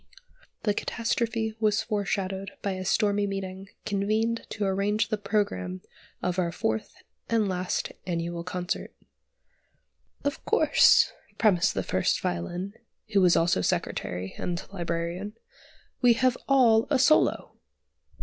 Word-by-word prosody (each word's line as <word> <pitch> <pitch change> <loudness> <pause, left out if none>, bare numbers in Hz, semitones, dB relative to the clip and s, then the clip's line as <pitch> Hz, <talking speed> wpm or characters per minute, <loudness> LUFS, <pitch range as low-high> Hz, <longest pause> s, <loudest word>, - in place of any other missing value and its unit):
The 210 - +2
catastrophe 225 0 -1
was 215 0 +2
foreshadowed 195 -2 -2
by 200 - 0
a 185 0 -4
stormy 205 +1 +2
meeting 195 -1 -5 0.2
convened 215 +3 0
to 210 - -2
arrange 205 +3 +1
the 215 - 0
programme 95 - -1 0.4
of 180 0 0
our 170 -2 0
fourth 110 -8 -2 0.3
and 225 -3 +2
last 185 -1 -2 0.2
annual 170 -1 -2
concert. 180 +1 -4 1.3
"Of 285 +1 -2
course," - - +5 0.2
premised 195 -6 +3
the - - 0
First - - +1
Violin, 175 - -3 0.4
who 200 - +5
was 180 -2 +5
also 165 - +3
Secretary 90 +1 -2
and 175 0 -3
Librarian, 170 +3 -3 0.7
"we 245 -2 +6
have 255 +1 +2
all 235 -5 +5
a 285 - +3
solo!" 155 - +3
195 Hz, 120 wpm, -27 LUFS, 175-220 Hz, 1.3 s, we